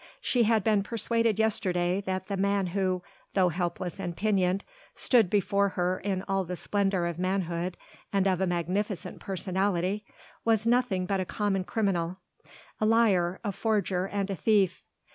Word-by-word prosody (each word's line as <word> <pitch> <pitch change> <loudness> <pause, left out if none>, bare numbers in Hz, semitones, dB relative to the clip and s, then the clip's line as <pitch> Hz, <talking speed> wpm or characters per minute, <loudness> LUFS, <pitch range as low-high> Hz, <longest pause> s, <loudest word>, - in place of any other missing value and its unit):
She 240 -3 +2
had 220 -2 +3
been 210 -1 +3
persuaded 230 +1 0
yesterday 185 -4 +1
that 185 0 -2
the 200 - -3
man 200 0 +1
who 185 -2 0 0.3
though 185 -2 +4
helpless 175 +1 -3
and 175 -3 -4
pinioned 195 -3 +1 0.3
stood 230 -7 +3
before 200 0 +2
her 180 0 -1
in 190 -2 -2
all 195 -1 +1
the 180 0 -5
splendour 195 -1 0
of 170 -1 -3
manhood 180 -1 -1 0.3
and 195 -1 +2
of 185 -1 +1
a 190 - +2
magnificent 180 +2 -2
personality 190 +1 -1 0.4
was 225 -1 +2
nothing 235 -6 +2
but 195 +1 0
a 185 - -1
common 195 -1 -1
criminal 185 -4 -1 0.6
a 215 - +2
liar, 195 -6 +3
a 205 - -1
forger 195 -3 0
and 200 0 -2
a - - -1
thief. 195 -2 +2
195 Hz, 160 wpm, -28 LUFS, 180-205 Hz, 0.6 s, though